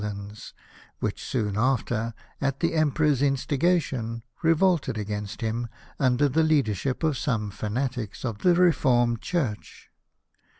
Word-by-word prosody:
lands, 105 Hz, 0 st, -7 dB, 0.4 s
which -, -, -3 dB
soon 105 Hz, -5 st, -1 dB
after, 115 Hz, -1 st, 0 dB, 0.3 s
at 140 Hz, 0 st, 0 dB
the 165 Hz, -, +1 dB
Emperor's 150 Hz, -3 st, +2 dB
in 140 Hz, -1 st, +3 dB
stigation, 135 Hz, -7 st, 0 dB, 0.2 s
revolted 165 Hz, -, +2 dB
against 105 Hz, +1 st, -4 dB
him 115 Hz, +1 st, -2 dB, 0.3 s
under 130 Hz, +1 st, +3 dB
the 150 Hz, +4 st, +2 dB
leadership 140 Hz, -, +1 dB
of 155 Hz, -3 st, +2 dB
some 110 Hz, -7 st, -1 dB
fanatics 115 Hz, +2 st, -3 dB
of 115 Hz, -4 st, -3 dB
the 180 Hz, -1 st, +4 dB
Reformed 125 Hz, -9 st, +3 dB
Church. 135 Hz, -13 st, -3 dB
125 Hz, 125 wpm, -26 LUFS, 110-150 Hz, 0.4 s, the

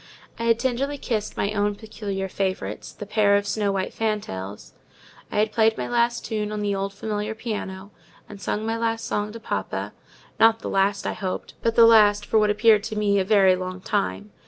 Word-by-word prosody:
I 230 Hz, -, -2 dB
had 230 Hz, -1 st, +4 dB
tenderly 260 Hz, +4 st, -1 dB
kissed 220 Hz, -6 st, -3 dB
my 200 Hz, -, 0 dB
own 205 Hz, 0 st, 0 dB
peculiar 200 Hz, -3 st, -5 dB
favourites, 185 Hz, -, -3 dB
the 205 Hz, -, -8 dB
pair 205 Hz, -1 st, +3 dB
of 205 Hz, 0 st, +1 dB
snow 205 Hz, -1 st, 0 dB
white 190 Hz, -1 st, -2 dB
fantails; 100 Hz, -, -4 dB, 0.6 s
I -, -, -3 dB
had 210 Hz, +1 st, +2 dB
played 220 Hz, 0 st, +3 dB
my -, -, -3 dB
last 240 Hz, 0 st, +1 dB
tune 210 Hz, -2 st, -2 dB
on 210 Hz, 0 st, -3 dB
the 205 Hz, -1 st, 0 dB
old 195 Hz, 0 st, -2 dB
familiar 210 Hz, +1 st, -4 dB
piano, 205 Hz, -4 st, -5 dB, 0.4 s
and 205 Hz, -1 st, -11 dB
sung 215 Hz, +1 st, -2 dB
my 225 Hz, 0 st, -1 dB
last 225 Hz, 0 st, -1 dB
song 210 Hz, 0 st, -2 dB
to 230 Hz, -, -8 dB
papa: -, -, -4 dB, 0.5 s
not 225 Hz, 0 st, +5 dB
the -, -, -4 dB
last, 195 Hz, +1 st, +1 dB
I -, -, -1 dB
hoped, 185 Hz, -3 st, -5 dB
but 230 Hz, 0 st, 0 dB
the 230 Hz, -, +8 dB
last 210 Hz, -2 st, +6 dB
for 220 Hz, -, +3 dB
what 210 Hz, -1 st, +3 dB
appeared 215 Hz, 0 st, +5 dB
to 220 Hz, -, -4 dB
me 205 Hz, -1 st, +2 dB
a -, -, +2 dB
very 195 Hz, -2 st, +5 dB
long 185 Hz, 0 st, -5 dB
time. 95 Hz, -, -2 dB
210 Hz, 205 wpm, -24 LUFS, 195-225 Hz, 0.6 s, the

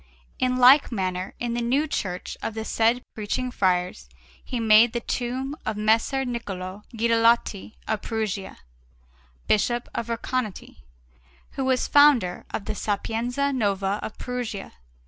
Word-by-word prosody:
In 255 Hz, 0 st, +1 dB
like 260 Hz, +3 st, +7 dB
manner, 185 Hz, -3 st, -3 dB
in 240 Hz, -1 st, -2 dB
the 240 Hz, -, -1 dB
new 260 Hz, +6 st, +1 dB
church 180 Hz, -, -4 dB
of 225 Hz, -, -4 dB
the 220 Hz, 0 st, -4 dB
said 230 Hz, +3 st, +1 dB
Preaching 250 Hz, +4 st, -3 dB
Friars 180 Hz, -, 0 dB, 0.3 s
he 245 Hz, -, -4 dB
made 225 Hz, +1 st, +6 dB
the 240 Hz, -, 0 dB
tomb 255 Hz, +4 st, -3 dB
of 220 Hz, -1 st, -3 dB
Messer 225 Hz, +5 st, +2 dB
Niccolò 200 Hz, -5 st, -5 dB, 0.2 s
Guidalotti 230 Hz, -2 st, +2 dB
of 220 Hz, -1 st, -1 dB
Perugia, 215 Hz, -4 st, -3 dB, 0.9 s
Bishop 240 Hz, +3 st, +1 dB
of 230 Hz, -, -3 dB
Recanati, 230 Hz, -2 st, -3 dB, 0.7 s
who 270 Hz, -, -3 dB
was 260 Hz, -1 st, +1 dB
founder 285 Hz, -11 st, +4 dB
of 200 Hz, -, -4 dB
the -, -, -2 dB
Sapienza 230 Hz, +7 st, -1 dB
Nuova 200 Hz, -4 st, 0 dB
of 220 Hz, -, -7 dB
Perugia. 245 Hz, -5 st, -5 dB
230 Hz, 135 wpm, -25 LUFS, 205-250 Hz, 0.9 s, like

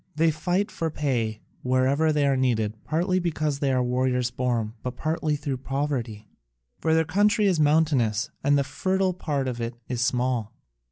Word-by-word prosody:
They 160 Hz, +1 st, +3 dB
fight 180 Hz, +7 st, -1 dB
for 165 Hz, -, -2 dB
pay 120 Hz, -8 st, -1 dB, 0.2 s
wherever 130 Hz, +5 st, +2 dB
they 150 Hz, -2 st, +2 dB
are 140 Hz, -1 st, +3 dB
needed, 115 Hz, -5 st, +1 dB
partly 180 Hz, +4 st, +1 dB
because 155 Hz, -5 st, -1 dB
they 140 Hz, -2 st, +1 dB
are 130 Hz, -1 st, +2 dB
warriors 125 Hz, 0 st, 0 dB
born, 120 Hz, -4 st, -1 dB
but 125 Hz, -1 st, -4 dB
partly 155 Hz, -1 st, -1 dB
through 145 Hz, -2 st, -3 dB
poverty; 130 Hz, -6 st, -3 dB, 0.5 s
for 160 Hz, 0 st, +2 dB
their 160 Hz, 0 st, +3 dB
country 205 Hz, +5 st, +3 dB
is 185 Hz, -5 st, +2 dB
mountainous, 145 Hz, -8 st, +2 dB
and 145 Hz, +1 st, +4 dB
the 140 Hz, -, +2 dB
fertile 185 Hz, +6 st, 0 dB
part 145 Hz, -6 st, -2 dB
of 120 Hz, -2 st, -3 dB
it 115 Hz, +1 st, -3 dB, 0.2 s
small. 125 Hz, -2 st, 0 dB
140 Hz, 165 wpm, -25 LUFS, 125-160 Hz, 0.5 s, and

